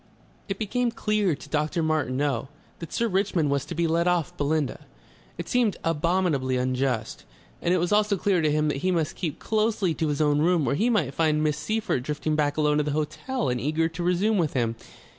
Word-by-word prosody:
It 195 - -2
became 235 +3 0
clear 210 -6 0
to 145 - -13
Dr. 155 +3 0
Martineau 140 -4 0 0.3
that 165 -2 -8
Sir 235 - 0
Richmond 190 -7 +1
was 140 -1 0
to 170 - -6
be 170 +1 +1
let 165 +2 +1
off 175 -4 0
Belinda. 145 -1 -1 0.5
It - - -5
seemed 240 -6 +1
abominably 165 -5 +1
unjust. 125 -2 -1 0.4
And 170 - +1
it 185 - +4
was 175 +2 0
also 210 -1 +3
clear 190 -1 +1
to 155 -1 +2
him 150 0 +1
that 145 - -1
he 185 +7 -1
must 165 -4 0
keep 165 -5 -3
closely 215 -5 0
to 160 - -1
his 145 -1 -1
own 150 -1 +3
room 165 -3 +2
or 120 - +2
he 220 +12 +1
might 165 - +1
find 155 -1 +1
Miss 150 -1 0
Seyffert 215 - -1
drifting 150 +3 -2
back 145 -1 0
alone 150 -1 +2
to 150 - +2
the 150 - -2
hotel 155 - -2
and 125 -1 -1
eager 155 +4 +1
to 165 +1 -7
resume 185 +4 +2
with 160 -4 0
him.... 115 -3 0
160 Hz, 210 wpm, -26 LUFS, 145-185 Hz, 0.5 s, it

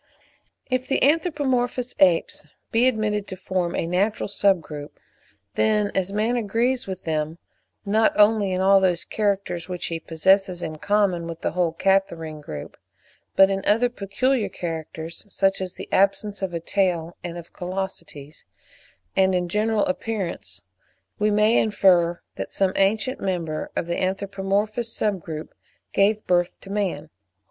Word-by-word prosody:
If 255 0 -1
the - - +1
anthropomorphous 265 -5 +1
apes 180 -4 +3 0.3
be 235 +3 +4
admitted 215 -4 0
to 185 - -6
form 185 -1 -2
a - - -1
natural 190 +5 0
sub 200 -2 +3
group, 150 -2 -9 0.5
then 210 -2 +2
as 190 0 -1
man 215 +4 +1
agrees 235 +3 0
with 190 -1 -6
them, 155 0 -2 0.5
not 215 +2 +3
only 210 -2 +5
in 185 0 0
all 195 +1 +6
those 180 -3 +1
characters 195 -4 -1
which 180 -1 -3
he 165 - -2
possesses 180 +3 +2
in 155 -1 -5
common 200 -4 +1
with 165 -1 -7
the - - -1
whole 175 -1 +1
Catarrhine 165 -4 0
group, 75 - -8 0.6
but 195 0 +6
in 195 0 -1
other 230 +4 +3
peculiar 235 +3 0
characters, 165 -1 -6
such 195 -1 +1
as 185 -1 -5
the - - -8
absence 200 +1 +1
of 190 -2 -2
a - - -1
tail 175 -2 0
and 175 -1 -5
of 170 -1 -11
callosities, 180 -6 -6 0.7
and 190 -1 +3
in 180 -1 0
general 215 +6 +1
appearance, 180 - -4 0.6
we 210 - +3
may 210 +2 +4
infer 180 -5 +3 0.2
that - - -5
some 190 -1 +1
ancient 215 +7 +1
member 170 -5 -2
of - - -1
the 170 0 -2
anthropomorphous 200 +4 -1
sub 205 -5 -1
group 155 -1 -7 0.4
gave 210 +2 +2
birth 175 -1 +1
to 195 - -10
man. 185 -7 -2
195 Hz, 150 wpm, -24 LUFS, 175-210 Hz, 0.7 s, all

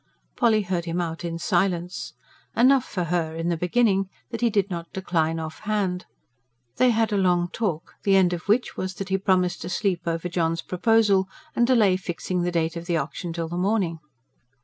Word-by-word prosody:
Polly 220 -3 +3
heard 180 -2 -2
him 170 +1 -2
out 170 0 -3
in 165 -1 -3
silence. 180 0 -1 0.4
Enough 260 +1 +5
for 180 -3 -3
her, 165 -1 -1
in 165 +1 -2
the 170 - +1
beginning, 195 +2 +2 0.2
that 230 - -4
he 240 - +4
did 200 -3 +1
not 170 -1 -5
decline 165 -4 0
off 160 -1 -6
hand. 205 -4 -1 0.7
They 255 - +5
had 225 -2 +2
a - - +2
long 175 -2 +2
talk, 180 -8 -3
the 195 -1 +3
end 185 -2 +4
of 175 +2 -5
which 225 +5 +2
was 185 0 -4
that 195 -1 -6
he 190 0 +1
promised 185 -2 +1
to 175 - -5
sleep 180 -2 -1
over 165 +1 -1
John's 165 -1 -1
proposal, 200 -1 +2 0.3
and 240 - +3
delay 215 -7 +4
fixing 180 0 -3
the 175 0 0
date 165 -1 0
of 170 0 -6
the 170 -2 +1
auction 165 +4 -4
till 165 0 -3
the 170 +2 -5
morning. 185 -4 0
180 Hz, 195 wpm, -25 LUFS, 170-200 Hz, 0.7 s, Enough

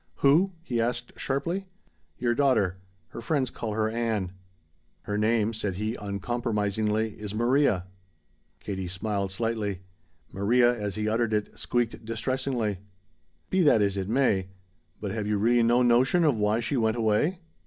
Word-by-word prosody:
"Who?" 165 +8 +4
he 120 -8 -1
asked 120 +1 -2
sharply. 170 +8 -2 0.5
"Your 120 -1 +1
daughter. 110 -9 +2 0.3
Her 115 - -8
friends 130 0 0
call 110 -2 -4
her 110 0 +1
Ann." 110 -5 -1 0.7
"Her 105 - -3
name," 110 +1 +2
said 105 -4 -3
he 105 +3 -2
uncompromisingly, 105 0 -1
"is 105 0 -5
Maria." 120 -5 +2 0.7
Katie 95 -3 -4
smiled 100 +2 -2
slightly. 105 -2 -2 0.5
Maria, 120 +6 +3
as 105 -4 -4
he 105 0 -2
uttered 110 0 +1
it, 105 -1 -1
squeaked 120 -2 -1
distressingly. 115 -2 -2 0.7
"Be 190 - +3
that 145 -10 +5
as 100 -1 +1
it 95 0 -3
may. 110 -7 +2 0.5
But 100 -2 -4
have 110 -1 -3
you 105 -1 +1
really 120 +4 +3
no 120 +2 +4
notion 125 +8 +4
of 150 -5 +4
why 105 +2 +1
she 135 +4 -1
went 110 0 +1
away?" 115 - +2
110 Hz, 150 wpm, -27 LUFS, 105-120 Hz, 0.7 s, that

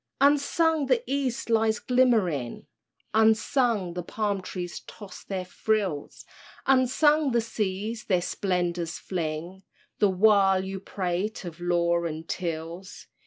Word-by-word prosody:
Unsung 295 +2 +3
the 475 -1 +2
East 270 -3 -2
lies 225 -1 +2
glimmering, 215 - +1 0.5
Unsung 220 -2 +2
the 180 - -3
palm 200 +2 -2
trees 180 -1 -6
toss 200 -4 -11
their 190 -2 -4
frills, 190 -6 -2 0.4
Unsung 270 +2 +3
the 235 - +4
seas 215 0 -3
their 185 -3 +2
splendors 175 -3 -1
fling, 170 +1 -4 0.4
The 205 - +4
while 195 -1 +4
you 190 0 -5
prate 190 +2 -3
of 170 -1 -8
laws 170 -1 +1
and 160 +1 -7
tills. 170 +1 -5
195 Hz, 120 wpm, -27 LUFS, 175-230 Hz, 0.5 s, the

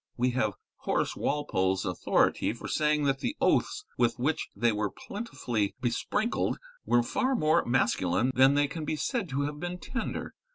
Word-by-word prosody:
We 125 +1 +2
have 110 -5 0 0.2
Horace - - -1
Walpole's 95 -10 0
authority 90 -2 +1
for - - -8
saying 150 -1 +1
that 135 -1 +1
the 270 - -3
oaths 415 - +1
with 120 -1 +2
which 150 +6 -1
they 115 +3 +2
were 105 -1 -1
plentifully 120 - -3
besprinkled 205 - 0 0.3
were 120 0 +4
far 260 - 0
more 155 -8 +3
masculine 120 -3 +2
than 135 +2 +5
they 145 0 +3
can 155 +3 -5
be 155 - -1
said 215 - -2
to 135 +1 -1
have 145 +1 -3
been 175 +2 -4
tender. 255 +7 -4
135 Hz, 165 wpm, -29 LUFS, 120-160 Hz, 0.3 s, than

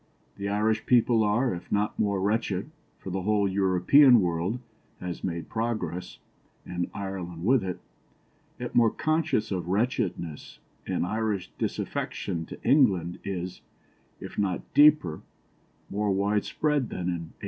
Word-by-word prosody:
The 100 0 -4
Irish 105 +2 0
people 120 -2 +4
are, 110 +4 +2
if 85 - -8
not 105 +1 0
more 100 -2 +1
wretched 105 +3 -1 0.3
(for 95 - -8
the 95 +1 -2
whole 105 +1 +2
European 100 +8 +5
world 90 +4 0 0.4
has 90 -1 -6
made 85 -2 -3
progress, 95 -7 -3 0.5
and 90 0 -3
Ireland 90 -4 -5
with 125 -1 +4
it), 90 -2 -4 0.8
yet - - -5
more 115 -2 +5
conscious 155 -7 0
of 90 -3 -2
wretchedness, 95 - -2 0.3
and - - 0
Irish 105 -1 -2
disaffection 80 -1 -3
to - - -9
England 100 - +3
is, 90 -2 -5 0.6
if - - -7
not 95 -3 -2
deeper, 145 - +5 0.7
more 105 +1 -1
widespread 105 +8 0
than - - -5
in - - -3
1800. 85 -2 -3
100 Hz, 135 wpm, -27 LUFS, 90-115 Hz, 0.8 s, European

